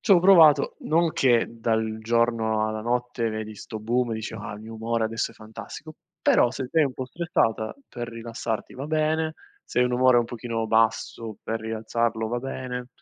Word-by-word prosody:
C'ho 195 -6 +6
provato 170 -5 +6
non 165 +1 +2
che 120 -3 +3
dal 110 -1 -1
giorno 115 -1 +1
alla 110 0 -3
notte 120 0 -1
vedi 110 0 -5
sto 110 +1 -7
boom 120 +3 0
e - - -1
dici: 110 +1 -5
"Ah 105 0 -6
il 105 - -10
mio 115 +1 -9
umore 115 0 -1
adesso 115 +1 -2
è - - -17
fantastico!," 110 +8 -10 0.3
però 120 - +4
se 130 0 -4
sei 160 -2 +4
un 135 - -2
po' 130 - -4
stressata 125 - -1
per 120 -1 -6
rilassarti 115 -1 -5
va 135 +3 -5
bene, 155 +1 0 0.3
se - - -3
hai - - +5
un 125 - -1
umore 125 0 +5
un 120 - +2
pochino 115 -1 -4
basso 110 -1 +1
per 115 0 -3
rialzarlo 110 0 -1
va 120 +2 -1
bene, 125 -1 -5
115 Hz, 190 wpm, -25 LUFS, 110-130 Hz, 0.3 s, C'ho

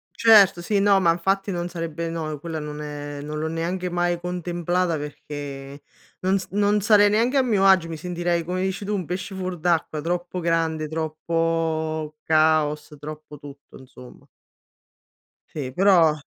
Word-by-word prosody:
Certo, 215 -6 +6
sì, 200 +4 0
no, 200 -1 +4
ma 170 -2 +4
infatti 195 +4 0
non 175 -1 -2
sarebbe 165 -1 -4
no, 155 -3 -4
quella 165 0 -5
non 150 0 -6
è 145 -1 -6
non 150 0 -5
l'ho 160 - -2
neanche 175 +3 -2
mai 175 0 0
contemplata, 175 0 -1
perché 145 -1 -7 0.4
non 190 +1 +1
s 190 - -6
non 205 +1 +2
sarei 205 0 +5
neanche 230 +6 +2
a - - +6
mio 215 -6 +2
agio, 185 -4 +5
mi 165 - -5
sentirei, 175 0 -1
come 180 +2 -2
dici 190 +1 -2
tu, 210 - -2
un 190 -4 -2
pesce 185 +4 -5
fuor 185 -1 -4
d'acqua. 160 -2 0
Troppo 175 +2 -3
grande, 165 -2 0
troppo 160 0 -2
caos, 155 -1 +2
troppo 150 0 -9
tutto, 145 0 -13
insomma. 125 -1 -15 1.2
Sì, 135 -4 -5
però 175 -1 +5
165 Hz, 160 wpm, -23 LUFS, 155-185 Hz, 1.2 s, Certo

